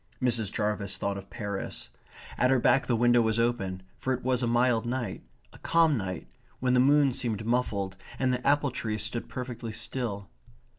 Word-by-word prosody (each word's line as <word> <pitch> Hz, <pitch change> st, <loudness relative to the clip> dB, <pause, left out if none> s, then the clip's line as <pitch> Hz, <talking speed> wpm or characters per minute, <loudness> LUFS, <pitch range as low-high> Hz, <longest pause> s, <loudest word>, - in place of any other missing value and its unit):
Mrs. 115 Hz, -5 st, +1 dB
Jarvis 105 Hz, -2 st, -2 dB
thought 100 Hz, 0 st, -1 dB
of 100 Hz, 0 st, -13 dB
Paris. 100 Hz, -, -5 dB, 0.5 s
At 125 Hz, -, +3 dB
her 135 Hz, -, +5 dB
back 130 Hz, +2 st, +3 dB
the 120 Hz, -, +2 dB
window 120 Hz, +1 st, +4 dB
was 110 Hz, -1 st, +1 dB
open, 105 Hz, -6 st, 0 dB, 0.2 s
for 130 Hz, -, 0 dB
it 125 Hz, -, -4 dB
was 130 Hz, 0 st, +1 dB
a 120 Hz, -, +1 dB
mild 120 Hz, -1 st, +3 dB
night; 120 Hz, -5 st, -3 dB, 0.3 s
a -, -, -14 dB
calm 165 Hz, -3 st, +3 dB
night; 95 Hz, -6 st, -4 dB, 0.3 s
when 125 Hz, 0 st, +1 dB
the 125 Hz, -, +5 dB
moon 140 Hz, +1 st, +5 dB
seemed 115 Hz, -4 st, -2 dB
muffled 105 Hz, -5 st, 0 dB, 0.2 s
and 130 Hz, -1 st, +1 dB
the 125 Hz, +1 st, -2 dB
apple 145 Hz, -1 st, +3 dB
trees 110 Hz, -4 st, -3 dB
stood 110 Hz, +2 st, -4 dB
perfectly 120 Hz, -3 st, -5 dB
still. 110 Hz, -3 st, -4 dB
120 Hz, 185 wpm, -28 LUFS, 105-125 Hz, 0.5 s, her